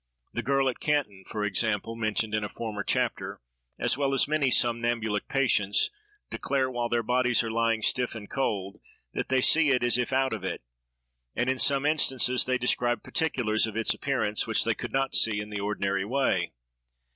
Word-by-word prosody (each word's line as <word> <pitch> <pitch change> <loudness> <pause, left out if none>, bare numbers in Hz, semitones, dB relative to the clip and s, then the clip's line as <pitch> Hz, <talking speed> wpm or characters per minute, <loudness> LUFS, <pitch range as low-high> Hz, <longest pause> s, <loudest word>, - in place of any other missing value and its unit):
The - - -2
girl 135 0 +1
at 125 - -2
Canton, 105 -11 -1
for 105 -2 -3
example, 105 +2 0
mentioned 110 -1 -1
in 110 0 0
a 105 - -4
former 110 -2 -5
chapter, - - -1 0.4
as - - 0
well 135 -1 +1
as 135 - +3
many 150 -3 +1
somnambulic 115 -3 0
patients, 110 -7 +2 0.4
declare, 130 -1 -1
while 120 -1 -2
their 120 0 0
bodies 125 0 +2
are 115 - -3
lying 115 -1 0
stiff 125 -2 +1
and 105 -2 -8
cold, 100 -8 -3 0.3
that - - -3
they 130 0 +2
see 155 +3 +5
it, 125 -2 +2
as 120 0 +3
if 125 - -1
out 130 -2 +1
of 105 -4 -5
it; 95 - -4 0.7
and, 125 +2 +1
in 130 - -3
some 140 +1 +3
instances, 130 -4 +2
they 130 0 +1
describe 120 -1 0
particulars 115 -9 +1
of 110 0 -6
its 115 - +2
appearance, 110 -7 -1
which - - +2
they - - +1
could - - -6
not 135 0 0
see 110 -2 +3
in 105 0 -6
the 105 - -3
ordinary 100 -1 -1
way. 100 -7 0
120 Hz, 190 wpm, -27 LUFS, 105-130 Hz, 0.7 s, see